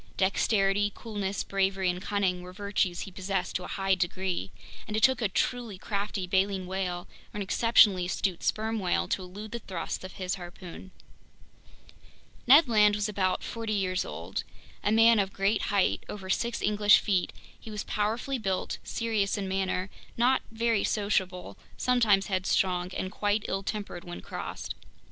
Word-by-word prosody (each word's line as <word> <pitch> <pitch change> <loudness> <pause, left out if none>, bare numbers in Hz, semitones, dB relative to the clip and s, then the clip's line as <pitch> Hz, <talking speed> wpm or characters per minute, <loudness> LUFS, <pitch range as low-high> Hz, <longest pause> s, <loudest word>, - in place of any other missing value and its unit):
Dexterity, 195 +1 +2
coolness, 200 -3 -3
bravery, 195 -1 0
and 180 0 -1
cunning 190 -3 0
were 180 0 -9
virtues 200 -3 -1
he 195 - -6
possessed 190 0 -3
to 180 - -1
a - - -6
high 195 -1 0
degree, 180 - -1 0.4
and 215 - -2
it 220 - -1
took 260 -2 +5
a 215 - +1
truly 235 0 -1
crafty 200 0 -3
baleen 190 +1 +1
whale 180 -1 -3 0.2
or - - -8
an 205 - -1
exceptionally 195 -3 +4
astute 185 -1 -1
sperm 220 +1 0
whale 175 - 0
to - - 0
elude 200 +4 -8
the 235 - -4
thrusts 185 -5 -5
of 185 - -8
his 185 -1 -3
harpoon. 175 +1 -10 1.6
Ned 285 +4 +8
Land 210 -3 +5
was 210 0 0
about 185 -3 0
forty 225 -2 -3
years 185 -2 0
old. - - -5 0.4
A 205 - +2
man 225 0 +6
of 195 -1 0
great 200 +3 +1
height—over 195 -1 0
six 235 +3 -1
English 210 0 +5
feet—he 200 +2 -3
was 210 -1 -4
powerfully 225 +6 -1
built, 190 -4 -2
serious 220 -3 -1
in 195 -1 -3
manner, 190 0 -1 0.3
not 250 +3 +3
very 225 -2 +1
sociable, 185 - -1 0.2
sometimes 225 -6 +3
headstrong, 185 -1 +1
and 185 - -3
quite 205 0 0
ill 195 - -1
tempered 200 -3 -5
when 175 0 -7
crossed. - - -6
195 Hz, 160 wpm, -28 LUFS, 185-215 Hz, 1.6 s, Ned